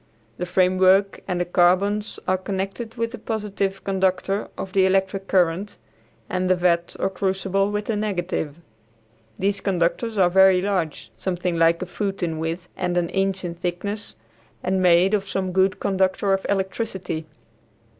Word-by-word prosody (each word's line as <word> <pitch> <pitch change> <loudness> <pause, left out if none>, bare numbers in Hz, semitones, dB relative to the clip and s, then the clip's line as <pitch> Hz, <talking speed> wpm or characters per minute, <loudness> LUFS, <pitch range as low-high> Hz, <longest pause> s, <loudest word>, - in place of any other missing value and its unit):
The 180 - -3
framework 185 +2 +3
and 180 -2 -1
the 175 - 0
carbons 190 +4 +2
are 185 - +3
connected 195 +4 -4
with 230 -1 -2
the 240 - -8
positive 205 -3 -3
conductor 190 +1 0
of 190 - -6
the 190 -1 +4
electric 190 0 0
current, 185 +2 +1 0.5
and 185 0 -1
the 185 - +5
vat 175 -1 +1
or - - +1
crucible 195 +1 0
with 210 0 -2
the 225 - -1
negative. 180 -7 -2 0.8
These 200 +1 0
conductors 195 +4 0
are 180 -2 +4
very 190 0 +6
large, 180 -5 -2
something 180 -1 -2
like 165 +1 +3
a - - -4
foot 195 +1 -3
in 160 -2 -2
width 165 +3 -3
and 180 -1 -1
an 170 -1 +1
inch 195 -1 -1
in 170 - -3
thickness, 180 - -4 0.5
and 185 +1 +1
made 180 +2 +5
of 200 -2 +1
some 190 -1 -1
good 190 +1 +2
conductor 195 0 +1
of 195 - -1
electricity. 190 -4 -2
190 Hz, 155 wpm, -23 LUFS, 180-195 Hz, 0.8 s, very